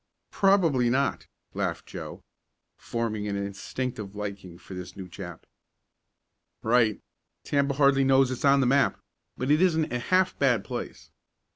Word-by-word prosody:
"Probably 165 -11 +3
not," 135 +3 0 0.3
laughed - - -2
Joe, - - -8 0.5
forming 110 -3 -3
an 100 - -2
instinctive 100 +2 -4
liking 100 -4 -6
for 95 - -12
this 90 +1 -8
new 95 -2 -7
chap. 90 -2 -9 1.2
"Right. 115 -2 +3 0.4
Tampa 140 -1 +1
hardly 140 -1 +4
knows 135 -1 +4
it's 130 - -5
on 140 -1 +5
the - - +2
map, 135 0 +2 0.4
but 130 +3 -1
it 155 +3 +4
isn't 160 -6 +2
a 125 - 0
half 185 +8 +2
bad 125 -7 +3
place. - - -7
125 Hz, 140 wpm, -27 LUFS, 105-140 Hz, 1.2 s, on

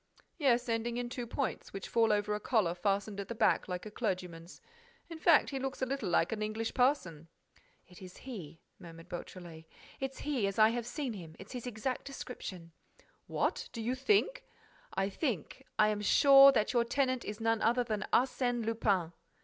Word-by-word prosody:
"Yes, 245 -4 +2
ending 230 +1 -1
in 245 0 -3
two 245 -1 -5
points, 270 +3 -3
which 195 - -6
fall 225 -1 +3
over 210 0 +1
a 210 - -2
collar 210 -6 +1
fastened 200 +2 -1
at 200 - -5
the 235 - -5
back, 220 -1 +2
like 180 +1 -4
a 215 - -7
clergyman's. 180 -6 -4 0.5
In 325 - -7
fact, 315 -2 +4
he 270 - -3
looks 270 0 -4
a 260 - 0
little 275 -5 -3
like 170 0 +2
an 220 -1 -3
English 215 +1 -2
parson." 185 - +1 0.6
"It's 180 0 -13
he," 175 - -9 0.2
murmured 165 0 -12
Beautrelet, 175 -2 -8 0.3
"it's 270 0 -4
he, 265 -9 -1
as 195 - -4
I 215 0 +7
have 235 0 -3
seen 270 -2 -3
him: 165 -6 -9
it's 195 - -12
his 250 -1 -6
exact 245 +2 -3
description." 185 -10 -7 0.6
"What! - - -1
Do 230 - -6
you 230 +3 -1
think—?" 410 - +1 0.5
"I 195 0 +1
think, 205 - -4
I 215 0 +5
am 210 -1 -1
sure 275 +5 +8
that 220 -2 +1
your 240 -1 +3
tenant 255 0 0
is 210 +1 -6
none 225 0 +1
other 240 +2 +3
than 215 -3 -3
Arsène 245 -2 +1
Lupin." 200 -7 +1
225 Hz, 185 wpm, -32 LUFS, 195-255 Hz, 0.6 s, sure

